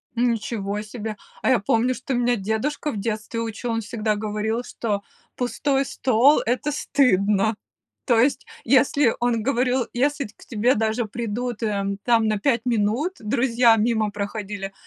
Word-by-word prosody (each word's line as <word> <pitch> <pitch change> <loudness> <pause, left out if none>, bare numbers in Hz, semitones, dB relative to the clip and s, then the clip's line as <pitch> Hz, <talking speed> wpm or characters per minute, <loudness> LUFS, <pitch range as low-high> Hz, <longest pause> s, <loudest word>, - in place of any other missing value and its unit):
Ничего 225 -4 -1
себе! 215 0 -6 0.3
А - - +1
я 255 - +4
помню, 230 +5 +1
что 255 +2 -5
меня 245 0 +2
дедушка 220 +9 -2
в 215 - -5
детстве 215 +2 -3
учил, 230 +1 -4
он 225 0 -1
всегда 215 0 -1
говорил, 215 +2 -2
что 210 -5 -3 0.3
пустой 270 +2 0
стол 260 +3 +3
это 255 +5 0
стыдно. 210 -7 +2 0.5
То 235 -3 +3
есть, 255 +2 +2 0.2
если 265 0 +3
он 240 -2 +1
говорил: 250 0 +1
"Если 280 +3 0
т 210 - -12
к - - -17
тебе 235 +2 +2
даже 220 +1 0
придут, 235 +2 -4
эм, 200 -3 -1
там 230 -2 +3
на 215 -1 0
5 235 0 +1
минут, 235 - 0
друзья 235 0 +3
мимо 220 -1 +1
проходили, 205 -1 -5
230 Hz, 155 wpm, -23 LUFS, 210-250 Hz, 0.5 s, я